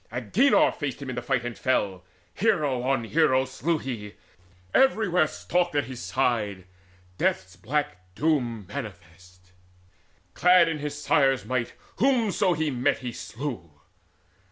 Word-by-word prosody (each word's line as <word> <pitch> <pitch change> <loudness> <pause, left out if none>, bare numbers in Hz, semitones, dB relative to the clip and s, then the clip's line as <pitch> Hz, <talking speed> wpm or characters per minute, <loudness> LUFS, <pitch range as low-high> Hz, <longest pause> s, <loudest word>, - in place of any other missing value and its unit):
Agenor 200 - +3
faced 145 -4 -5
him 135 -2 -5
in - - -5
the 125 - -3
fight, 120 0 -1
and 120 -1 -4
fell: 100 -8 -1 0.3
Hero 155 - +1
on 130 -1 0
hero 130 +1 +2
slew 155 +5 -1
he; 110 -8 -6 0.6
everywhere 200 -11 +3
Stalked 175 +1 -1
at 145 - +2
his 125 0 -8
side 105 -8 -1 0.5
Death's 90 0 0
black 145 +3 -2 0.2
doom 120 -9 0
manifest: 90 -5 -10 0.8
Clad 180 -1 +5
in 160 -2 -2
his 150 0 -5
sire's 135 -2 +2
might, 125 -2 -2 0.2
whomso 225 -8 +2
he 155 -2 -1
met 125 -1 +1
he 120 - -2
slew. 110 - -7
130 Hz, 130 wpm, -26 LUFS, 115-155 Hz, 0.8 s, Clad